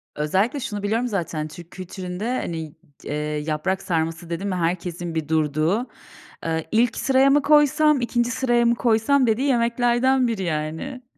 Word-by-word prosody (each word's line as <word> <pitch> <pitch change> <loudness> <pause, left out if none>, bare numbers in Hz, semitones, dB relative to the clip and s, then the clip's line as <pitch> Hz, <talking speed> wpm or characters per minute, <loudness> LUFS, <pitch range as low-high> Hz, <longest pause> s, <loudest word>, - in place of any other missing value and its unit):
Özellikle 190 - 0
şunu 210 -5 -5
biliyorum 225 +4 0
zaten, 165 -7 -3
Türk 170 +2 -12
kültüründe, 185 +1 -6
hani, 160 -3 -5 0.3
d - - -10
eee, - - -2 0.4
yaprak 190 +5 -1
sarması 165 0 -2
dedin 170 +4 -3
mi 185 - -1
herkesin 175 -1 -2
bir 155 -2 -2
durduğu, 160 - +1 0.6
eee, 160 -1 -2
"İlk 230 +2 +2
sıraya 270 0 +3
mı 290 +1 +4
koysam, 295 -1 +4
2'nci 240 0 0
sıraya 240 -1 +1
mı 235 0 +3
koysam?" 235 +3 +2
dediği 245 +6 +1
yemeklerden 245 +1 +2
biri, 215 -5 -2
yani. 160 - -4
205 Hz, 155 wpm, -23 LUFS, 165-245 Hz, 0.6 s, mı